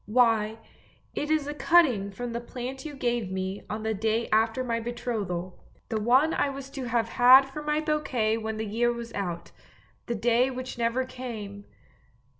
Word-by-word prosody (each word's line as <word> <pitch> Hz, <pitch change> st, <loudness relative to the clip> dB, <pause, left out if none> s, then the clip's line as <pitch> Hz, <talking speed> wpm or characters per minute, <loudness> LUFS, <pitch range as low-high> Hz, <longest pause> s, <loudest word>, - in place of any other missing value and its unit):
< -, -, -37 dB
Why 225 Hz, -1 st, +3 dB, 0.6 s
it 295 Hz, -, -3 dB
is 310 Hz, -2 st, +2 dB
a 295 Hz, -, -4 dB
cutting 295 Hz, -, +3 dB
from 235 Hz, +4 st, -5 dB
the 235 Hz, -, -3 dB
plant 255 Hz, +3 st, -6 dB
you 300 Hz, -2 st, -6 dB
gave 240 Hz, -6 st, -1 dB
me 190 Hz, +1 st, -3 dB
on 215 Hz, +1 st, -4 dB
the 220 Hz, 0 st, 0 dB
day 220 Hz, +2 st, 0 dB
after 225 Hz, +4 st, +2 dB
my 230 Hz, -2 st, -1 dB
betrothal; 215 Hz, -7 st, -4 dB, 0.3 s
the 220 Hz, -1 st, -1 dB
one 260 Hz, +8 st, +4 dB
I 285 Hz, -, +1 dB
was 275 Hz, 0 st, -7 dB
to 270 Hz, -2 st, -5 dB
have 230 Hz, -1 st, 0 dB
had 255 Hz, +3 st, +8 dB
for 270 Hz, +3 st, -7 dB
my 300 Hz, +1 st, 0 dB
bouquet 260 Hz, -8 st, 0 dB
when 220 Hz, 0 st, -4 dB
the 220 Hz, -, -2 dB
year 235 Hz, +3 st, +1 dB
was 235 Hz, -1 st, -6 dB
out 175 Hz, -4 st, -4 dB, 0.3 s
— -, -, -34 dB
the 235 Hz, -, -1 dB
day 240 Hz, +3 st, +2 dB
which 255 Hz, 0 st, -6 dB
never 235 Hz, +2 st, 0 dB
came! 220 Hz, -6 st, -7 dB
235 Hz, 190 wpm, -27 LUFS, 220-260 Hz, 0.6 s, had